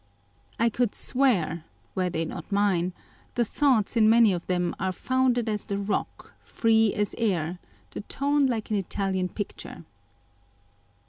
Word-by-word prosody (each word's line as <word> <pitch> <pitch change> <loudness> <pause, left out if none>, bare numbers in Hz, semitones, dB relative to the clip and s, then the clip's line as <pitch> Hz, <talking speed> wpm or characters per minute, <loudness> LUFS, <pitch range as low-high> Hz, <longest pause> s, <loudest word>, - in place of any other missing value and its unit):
I 230 +1 +4
could 235 -1 -1
swear 205 - +1 0.3
(were 185 -1 0
they 165 -1 -2
not 160 - -8
mine) 195 -3 +2 0.4
the 240 - +2
thoughts 250 -4 +1
in 220 -2 +5
many 225 -3 +6
of 175 -1 -5
them 180 -1 0
are 190 +1 0
founded 250 +3 +1
as 210 -2 -1
the 200 -2 -2
rock, 200 0 -3
free 225 -2 +2
as 205 -1 -1
air, 180 -6 0 0.3
the - - -6
tone 280 +5 +1
like 225 -4 -3
an 210 - +2
Italian 190 -1 -1
picture. 205 -4 -7
210 Hz, 145 wpm, -26 LUFS, 185-235 Hz, 0.4 s, many